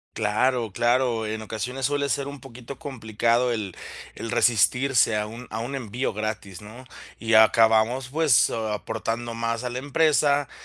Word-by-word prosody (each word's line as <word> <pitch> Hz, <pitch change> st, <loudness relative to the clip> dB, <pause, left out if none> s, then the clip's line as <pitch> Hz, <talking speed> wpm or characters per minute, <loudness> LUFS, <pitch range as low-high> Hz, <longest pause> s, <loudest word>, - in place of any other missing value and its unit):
Claro, 115 Hz, +1 st, 0 dB
claro, 120 Hz, -2 st, +1 dB
en 110 Hz, 0 st, -4 dB
ocasiones 125 Hz, +4 st, -4 dB
suele 140 Hz, 0 st, 0 dB
ser 140 Hz, -1 st, -1 dB
un 140 Hz, 0 st, -8 dB
poquito 125 Hz, +1 st, -10 dB
complicado 120 Hz, -1 st, 0 dB
el 105 Hz, -5 st, -4 dB, 0.4 s
el 115 Hz, -, -6 dB
resistirse 120 Hz, +1 st, +3 dB
a 105 Hz, 0 st, -1 dB
un 115 Hz, +3 st, -9 dB
a 110 Hz, -, -3 dB
un 125 Hz, +4 st, -4 dB
envío 125 Hz, 0 st, -3 dB
gratis, 105 Hz, -3 st, -5 dB
¿no? 115 Hz, +5 st, -12 dB, 0.3 s
Y 115 Hz, -1 st, +1 dB
acabamos, 115 Hz, +3 st, +4 dB
pues, 150 Hz, -5 st, +3 dB
aportando 115 Hz, +1 st, -3 dB
más 115 Hz, +1 st, -2 dB
a 125 Hz, -, -2 dB
la 120 Hz, -, -5 dB
empresa. 145 Hz, 0 st, +2 dB
120 Hz, 150 wpm, -24 LUFS, 110-130 Hz, 0.4 s, acabamos